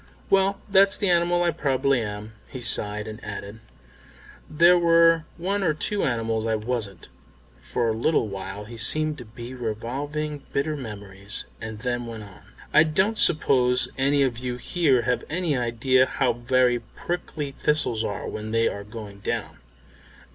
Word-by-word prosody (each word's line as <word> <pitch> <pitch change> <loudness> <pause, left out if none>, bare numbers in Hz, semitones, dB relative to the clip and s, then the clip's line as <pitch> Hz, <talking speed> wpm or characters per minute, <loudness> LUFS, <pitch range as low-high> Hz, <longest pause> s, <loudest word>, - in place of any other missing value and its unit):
"Well, 195 0 +3
that's 195 -1 +5
the 200 -3 +1
animal 175 0 +2
I 170 - +2
probably 135 -3 +1
am." 105 0 -6
He 130 - -8
sighed 105 -2 +2
and 110 0 -8
added, 100 +2 -7 0.9
"There 170 +3 +6
were 165 -1 +5
one 195 +4 -1
or 160 -5 +1
two 205 +6 -1
animals 115 -2 -1
I 110 - +1
wasn't." 110 -3 -4 0.5
For 120 -2 -1
a 110 - +1
little 120 +1 +1
while 100 +1 -6
he 115 +2 -10
seemed 155 +6 +2
to 120 - -9
be 120 +3 -9
revolving 135 +6 -4
bitter 150 +3 0
memories, 100 -6 -6 0.2
and 110 -1 -7
then 120 -1 -2
went 115 -2 -7
on, 100 -3 -14 0.3
"I 155 - +8
don't 190 +8 +1
suppose 125 -6 +3
any 140 +1 +2
of 120 -3 -1
you 125 -1 -3
here 135 -3 +1
have 125 0 0
any 165 -2 -1
idea 125 +2 +2
how 130 - +1
very 120 +1 +2
prickly 150 +3 -5
thistles 135 -5 +1
are 100 -2 -4
when 110 0 -5
they 115 +1 +2
are 100 - -4
going 105 -1 -9
down. 100 - -4
125 Hz, 160 wpm, -25 LUFS, 110-155 Hz, 0.9 s, I